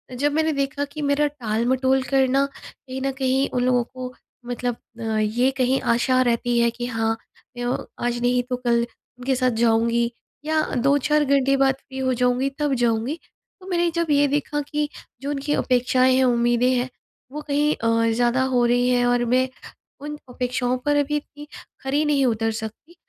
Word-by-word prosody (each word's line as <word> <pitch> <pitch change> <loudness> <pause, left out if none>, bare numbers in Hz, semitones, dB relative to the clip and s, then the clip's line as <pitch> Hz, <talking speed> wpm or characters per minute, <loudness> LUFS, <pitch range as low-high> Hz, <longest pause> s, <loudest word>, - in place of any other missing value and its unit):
जब 285 +4 +1
मैंने 315 +1 +2
देखा 280 0 -1
कि 295 +2 -8
मेरा 285 +1 +2
टालमटोल 260 0 0
करना 270 +1 +2
कहीं 265 -1 -9
न 270 0 0
कहीं 265 +1 +1
उन 245 - +1
लोगों 250 -1 +3
को 255 +1 -8 0.3
मतलब 245 0 -2 0.2
अ, - - -5 0.2
ये 235 +5 +2
कहीं 260 +1 +2
आशा 255 +2 +2
रहती 240 -1 +1
है 235 0 +4
कि 240 +1 -5
हाँ, 225 -2 -1 0.4
य 245 +1 -1 0.2
आज 240 0 -1
नहीं 245 +1 +2
तो 250 - 0
कल 235 -1 +1 0.3
उनके 260 +1 0
साथ 255 0 +2
जाऊँगी 235 +1 +2 0.3
या 315 0 +2
2-4 285 +4 +2
घंटे 275 0 +3
बाद 270 0 +3
फ्री 265 0 -12
हो 260 -1 +1
जाऊँगी 250 +2 +1
तब 295 -2 +1
जाऊँगी। 240 +5 0 0.4
तो 370 - -12
मैंने 345 -2 +1
जब 335 -2 0
ये 285 0 +4
भी 290 +1 +2
कहा 295 0 -4
कि 295 0 -1 0.3
जो 280 - -4
उनकी 290 +1 -1
अपेक्षाएँ 255 0 +2
हैं 260 - +3
उम्मीदें 240 0 +3
हैं 250 0 0 0.4
वो 300 - -5
कहीं 295 +1 +2
और 230 0 +2
ज़्यादा 245 +2 +2
हो 245 -1 +3
रही 245 +1 +2
हैं 245 -1 +3
और 245 0 +2
मैं 255 +1 +3 0.5
उन 295 +1 -6
अपेक्षाओं 250 0 -1
पर 290 - +2
अभी 290 +1 +1
इतनी 295 0 -10 0.3
खरी 280 +3 0
नहीं 285 -2 +2
उतर 225 -2 +1
सकती। 225 +9 -8
255 Hz, 180 wpm, -23 LUFS, 245-280 Hz, 0.5 s, है